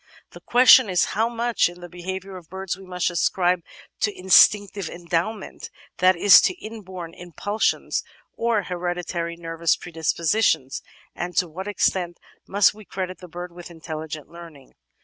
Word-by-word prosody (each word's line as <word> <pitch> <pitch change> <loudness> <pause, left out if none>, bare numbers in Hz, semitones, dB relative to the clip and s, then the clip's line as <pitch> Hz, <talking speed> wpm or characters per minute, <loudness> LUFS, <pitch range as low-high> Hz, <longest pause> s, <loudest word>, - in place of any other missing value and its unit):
The - - -12
question 250 -2 +6
is 180 -2 +2
how 225 +3 +1
much 235 -4 +1
in 175 0 -13
the 175 - -9
behaviour 190 +2 -7
of 175 -3 -12
birds 190 -1 -4
we 190 0 -14
must 180 -1 -1
ascribe 175 +1 +1 0.4
to 210 - +1
instinctive 195 0 +4
endowment, 175 +5 -4 0.3
that 185 +1 +5
is, 190 +3 +8
to 370 - +1
inborn 190 - -9
impulsions 180 +5 -2 0.3
or 230 -3 0
hereditary 175 -1 -3
nervous 165 -1 0
predispositions, 160 -2 0 0.3
and 175 0 -5
to 180 - +3
what 185 +5 -7
extent 180 -4 0 0.3
must 200 +1 +4
we 215 +1 -13
credit 185 -2 -5
the 180 - -11
bird 175 +1 -8
with 175 0 -11
intelligent 155 -2 -7
learning? 165 -6 -13
180 Hz, 150 wpm, -23 LUFS, 170-195 Hz, 0.4 s, is